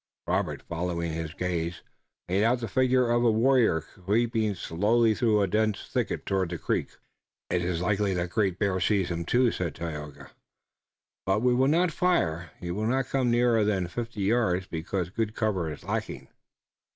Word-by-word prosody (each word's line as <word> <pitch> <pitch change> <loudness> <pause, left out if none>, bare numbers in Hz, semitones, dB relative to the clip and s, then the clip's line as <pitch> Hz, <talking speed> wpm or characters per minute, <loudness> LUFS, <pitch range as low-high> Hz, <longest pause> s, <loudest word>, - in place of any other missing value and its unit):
Robert, - - -1
following 85 0 -3
his 80 0 -5
gaze, 85 -2 -3 0.4
made 95 +4 +1
out 120 +2 +3
the 115 - -4
figure 125 +2 +2
of 120 0 +2
a 120 - +5
warrior 115 -6 +3
creeping 110 +5 -1
slowly 110 +7 +2
through 105 -2 +2
a - - +1
dense 110 +2 0
thicket - - -2
toward 95 -3 0
the 85 - -4
creek. - - -2 0.5
"It 90 0 +1
is 90 -1 -1
likely 100 0 +1
that 90 0 -2
Great 95 -4 +1
Bear 95 -2 0
sees 95 -1 +1
him, 85 0 -3
too," 120 +5 +3
said 85 -5 -3
Tayoga, 75 -3 -7 0.9
"but 95 +4 +1
we 125 -1 +4
will 130 +2 +3
not 170 +4 +3
fire. 85 - 0
He 85 -2 -5
will 105 +4 -1
not 130 +2 0
come 130 -3 +1
nearer 120 -2 +3
than 100 -3 +1
fifty 115 +3 -5
yards, 95 -3 +1
because 85 +2 -3
good 110 +1 -2
cover 95 -7 -1
is 75 - -9
lacking." - - -4
100 Hz, 175 wpm, -27 LUFS, 85-120 Hz, 0.9 s, a